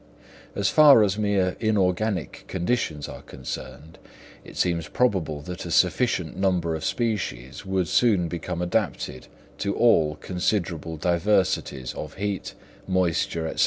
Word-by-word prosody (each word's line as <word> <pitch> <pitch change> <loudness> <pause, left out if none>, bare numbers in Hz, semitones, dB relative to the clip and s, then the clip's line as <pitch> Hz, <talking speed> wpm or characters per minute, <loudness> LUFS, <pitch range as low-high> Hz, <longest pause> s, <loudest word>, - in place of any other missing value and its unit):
As 100 -1 +1
far 145 -7 +7
as 100 0 0
mere 100 -3 +1
inorganic 100 -3 0
conditions 90 -6 -1
are - - -9
concerned, 65 +4 -8 0.4
it - - -12
seems 85 -3 0
probable 90 -12 0
that 90 +1 -6
a 85 - -6
sufficient 90 -1 +1
number 90 -3 +1
of 80 -1 -4
species 95 - -3
would 95 -2 0
soon 95 +1 +3
become 85 +1 -4
adapted 90 - -2 0.3
to 100 0 -1
all 80 -10 +4
considerable 85 -2 -2
diversities 85 - 0
of 75 0 -7
heat, 100 0 -3 0.3
moisture, 85 -3 0
&c. - - -6
90 Hz, 125 wpm, -25 LUFS, 80-100 Hz, 0.4 s, far